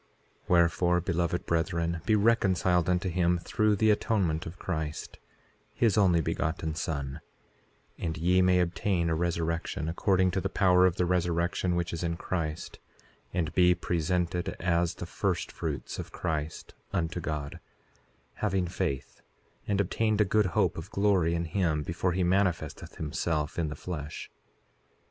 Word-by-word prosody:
4:11 - - -37 0.4
Wherefore, 90 0 +3
beloved 85 -1 -1
brethren, 85 0 0
be 110 - +4
reconciled 95 -5 +3
unto 90 +1 +1
him 90 0 +2
through 105 +5 +1
the 110 +2 +4
atonement 95 -7 0
of 85 +3 -9
Christ, 80 -4 -4 0.6
his 115 -5 +3
Only 90 -5 +4
Begotten 80 +1 -2
Son, 75 -3 -4 0.8
and 80 -2 -3
ye 90 +3 +3
may 90 0 +4
obtain 85 0 0
a - - +2
resurrection, 85 -2 -1
according 95 +2 +2
to 95 - -1
the 95 - -2
power 90 -2 +4
of 85 - 0
the 90 - +1
resurrection 90 0 0
which 85 -1 -1
is 85 - -3
in 85 -1 -1
Christ, 80 -4 -4 0.5
and 85 -3 -1
be 90 -1 +5
presented 85 +1 -1
as 85 0 +1
the - - -6
first - - -2
fruits - - -4
of - - -6
Christ 80 -1 -4 0.2
unto 80 +1 -1
God, 75 -3 -4 0.8
having 95 -1 0
faith, 85 -7 -3 0.5
and 100 -1 +1
obtained 105 +2 +1
a 105 - +5
good 105 +1 +2
hope - - +2
of 80 +5 -9
glory 95 -5 +2
in 85 0 -1
him 80 -3 0
before 85 +3 -1
he 90 +1 +1
manifesteth 90 -4 0
himself 75 0 -2
in 80 - 0
the 75 - -5
flesh. 75 -2 -6
85 Hz, 150 wpm, -29 LUFS, 80-95 Hz, 0.8 s, be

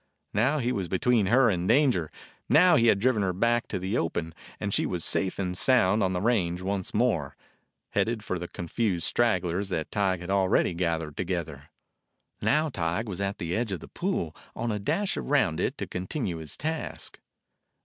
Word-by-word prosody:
Now 130 +9 +2
he 125 -3 0
was 95 -7 -2
between 105 +3 +2
her 125 +4 +5
and 90 -3 0
danger. 125 - +3 0.4
Now 175 +2 +6
he 115 - +4
had 105 - +5
driven 115 +1 +2
her 95 -2 0
back 115 +5 +1
to - - -3
the 95 +5 -1
open, 80 0 -2 0.3
and 100 -1 -2
she - - +1
was 90 -3 -2
safe 95 -1 0
and 90 -2 -2
sound 110 -2 +3
on 95 -1 +2
the 90 - -1
range 90 -6 +1
once 95 -1 -2
more, 105 - 0 0.6
headed 115 -2 0
for 95 -4 -3
the 90 - -5
confused 90 +1 -2
stragglers 95 -4 +1
that 80 -4 -3
Tige 95 -3 0
had 90 +2 -5
already 95 -2 +2
gathered 80 -3 -2
together. 85 -5 -4 0.7
Now 155 +1 +2
Tige 85 +2 -1
was 100 -3 -5
at 100 0 -2
the 85 -2 -3
edge 115 -1 -1
of 95 - -3
the - - -11
pool, 175 - -2 0.2
on 120 - -2
a 105 - -2
dash 195 - -1
around 60 - +1
it, - - -1
to - - -3
continue 95 - -3
his 80 -3 -5
task. 160 +1 -4
95 Hz, 190 wpm, -27 LUFS, 85-120 Hz, 0.7 s, Now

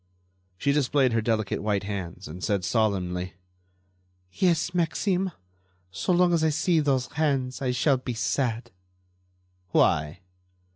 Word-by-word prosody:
She 140 - +1
displayed 140 -3 +2
her 115 - +2
delicate 110 -2 -1
white 105 -2 0
hands 95 -2 -5
and 90 +4 -9
said, 100 -4 0
solemnly: 90 -5 -1 1.0
"Yes, 175 - +1
Maxime; 180 +2 0 0.6
so 95 - -2
long 175 0 +4
as 165 -2 +2
I 160 - +4
see 160 +2 +2
those 135 -4 +1
hands 135 -5 -1
I 130 - 0
shall 130 +2 +2
be 125 -1 -5
sad." 120 0 -1 1.0
"Why?" 75 0 +2
125 Hz, 130 wpm, -26 LUFS, 100-155 Hz, 1.0 s, long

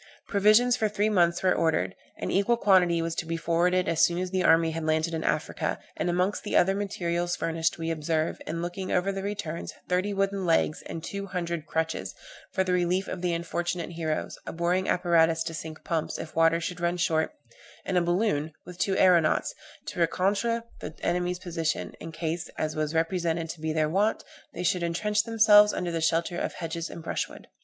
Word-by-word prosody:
Provisions 215 +4 +4
for 220 -3 0
three 210 +1 +1
months 175 -4 +2
were 185 - +4
ordered; 160 - +1 0.2
an - - -3
equal 200 +5 +2
quantity 180 -6 +4
was 165 0 -2
to 165 - -3
be 165 0 -2
forwarded 175 +2 +1
as 165 -1 +2
soon 170 - +3
as 180 0 -2
the 185 -1 +1
army 165 0 +4
had 165 0 -4
landed 160 +1 0
in 160 -1 -2
Africa; - - -1 0.2
and, - - -1
amongst 180 +3 0
the 210 - +1
other 190 +2 +4
materials 175 -3 -1
furnished 165 0 -1
we 165 0 -2
observe, 160 0 -1
in 165 +2 -3
looking 180 +2 -4
over 180 +2 +1
the 195 0 -4
returns, 195 -5 -4
thirty 185 +3 0
wooden 195 0 0
legs, 165 -3 +2
and 165 - -6
two 200 0 -5
hundred 170 -4 -3
crutches, 160 0 -2 0.4
for 190 - +1
the 185 -1 0
relief 180 +2 +1
of 180 - -5
the 180 -1 0
unfortunate 170 +1 -2
heroes, 160 -2 -3
a - - -3
boring 175 +3 0
apparatus 165 -2 +3
to 165 0 -5
sink 160 0 -7
pumps, 165 -4 -2
if 155 - -8
water 165 +1 +4
should 180 +1 -4
run 175 +1 0
short, 170 - 0 0.5
and 190 - -2
a 180 - +4
balloon, 175 -4 0
with 180 0 -11
two 195 -1 +1
aeronauts, 175 -4 +4 0.3
to - - -6
reconnoitre 200 +7 +1 0.2
the 160 - -7
enemy's 180 0 0
position, 165 -3 -3
in 165 - -7
case, 160 +1 -3
as 155 0 -2
was 155 +1 -2
represented 165 0 0
to 160 - -7
be 160 0 -1
their 155 -1 +1
wont, 200 +7 +1 0.3
they - - -5
should 180 0 +1
entrench 210 +5 0
themselves 210 -2 +6
under 175 -1 -3
the 165 -1 -2
shelter 170 +2 +1
of - - -2
hedges 165 -1 -4
and 165 - -9
brushwood. - - -4
175 Hz, 200 wpm, -27 LUFS, 165-190 Hz, 0.5 s, themselves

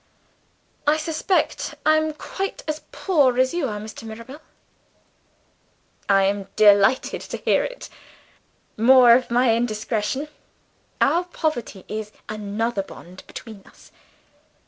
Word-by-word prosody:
"I 300 +1 +4
suspect 325 +4 -1
I 310 0 +5
am 310 0 0
quite 385 +5 -5
as 310 0 -3
poor 285 -10 +2
as 260 0 +2
you 340 -5 -1
are, 210 -3 -4
Mr. 215 +1 -9
Mirabel." 230 +6 -10 1.7
"I 195 -1 +5
am 195 0 -1
delighted 205 +4 +4
to - - -6
hear - - +2
it. - - -7 0.9
(More 245 +1 +7
of 250 +1 +2
my 240 0 +3
indiscretion!) 230 +4 -2 0.7
Our 350 +1 +3
poverty 310 - -3
is 215 0 -5 0.2
another 215 +1 -2
bond 185 -1 -12
between 220 -4 -10
us." - - -19
240 Hz, 120 wpm, -23 LUFS, 210-305 Hz, 1.7 s, More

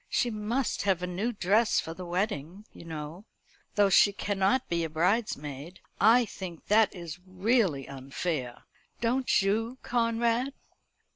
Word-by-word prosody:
She 240 - +1
must 225 +5 -1
have 190 -3 +1
a - - +1
new 190 +7 -2
dress 210 +2 +2
for 160 - -4
the 180 +1 -8
wedding, 185 0 -3
you - - -12
know; 160 +4 -7 0.5
though 205 -2 +4
she 200 - +6
cannot 200 +5 0
be 170 -1 0
a 165 - -2
bridesmaid. 160 - -1 0.2
I 235 +2 +6
think 185 -5 -8
that 215 0 +4
is 170 -1 -7
really 185 - +1
unfair. 135 -1 -4 0.4
Don't 245 -2 +2
you, 225 +5 0
Conrad?" 235 +2 +1
195 Hz, 140 wpm, -29 LUFS, 170-225 Hz, 0.5 s, she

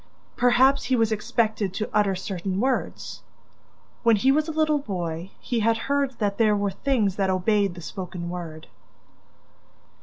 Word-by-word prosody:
Perhaps 255 +3 +4
he 260 - +2
was 225 -2 +2
expected 215 -2 0
to 215 - -2
utter 205 -2 +3
certain 185 0 -3
words? 260 +3 -2 0.8
When 230 -2 +5
he 260 +6 +3
was 305 +3 +2
a - - -2
little 310 -1 +2
boy, 175 - -4
he 240 - -2
had 225 +1 +2
heard 275 +1 -1
that 205 -1 -1
there 215 -2 +4
were 200 -1 0
things 210 -4 0
that 195 -1 +1
obeyed 195 0 +1
the 175 - -9
spoken 180 0 -6
word! 170 -3 -6
210 Hz, 155 wpm, -25 LUFS, 190-250 Hz, 0.8 s, When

